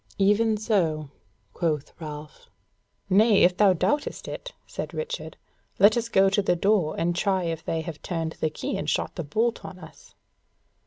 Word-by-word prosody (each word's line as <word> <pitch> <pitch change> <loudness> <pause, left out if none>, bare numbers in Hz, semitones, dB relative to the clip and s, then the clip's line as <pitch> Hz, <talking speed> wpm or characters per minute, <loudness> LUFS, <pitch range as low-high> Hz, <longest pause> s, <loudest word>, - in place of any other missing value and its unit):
"Even 210 +2 +3
so," 165 - 0 0.4
quoth 155 -4 -2
Ralph. 150 -2 -9 0.6
"Nay, 205 +2 +5
if 180 0 +4
thou 200 0 +5
doubtest 290 - -1
it," - - -6
said - - -6
Richard, 485 +1 -5 0.4
"let 205 +2 +6
us 235 -1 -1
go 195 -3 +4
to 195 +1 +2
the 180 -2 +1
door 185 -3 +1
and 170 +1 0
try 190 0 +1
if 165 -2 -3
they 165 - -2
have 160 -2 -7
turned 165 -2 -3
the 155 - +1
key 155 - -4
and - - -3
shot - - -1
the 170 - -4
bolt 225 +11 -1
on 185 - -8
us." 160 -3 -15
185 Hz, 170 wpm, -26 LUFS, 160-210 Hz, 0.6 s, let